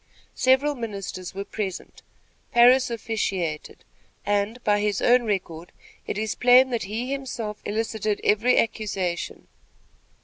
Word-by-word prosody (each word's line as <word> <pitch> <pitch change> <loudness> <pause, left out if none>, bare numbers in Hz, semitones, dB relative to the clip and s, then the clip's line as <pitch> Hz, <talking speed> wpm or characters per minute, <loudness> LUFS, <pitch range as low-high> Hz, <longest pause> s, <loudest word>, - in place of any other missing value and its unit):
Several 265 +3 +3
ministers 200 -7 -6
were 200 +1 -4
present. 200 -3 -6 0.5
Parris 245 +2 +5
officiated, 195 -9 -3 0.4
and, 205 +3 0
by 205 0 +2
his 205 -2 0
own 245 0 +4
record, 180 -5 -3 0.4
it - - -3
is 215 0 -1
plain 250 +1 +5
that 235 -5 -2
he 230 +6 -4
himself 245 -6 -5
elicited 215 -1 -2
every 220 +4 +3
accusation. 195 -6 -2
215 Hz, 115 wpm, -24 LUFS, 200-245 Hz, 0.5 s, Parris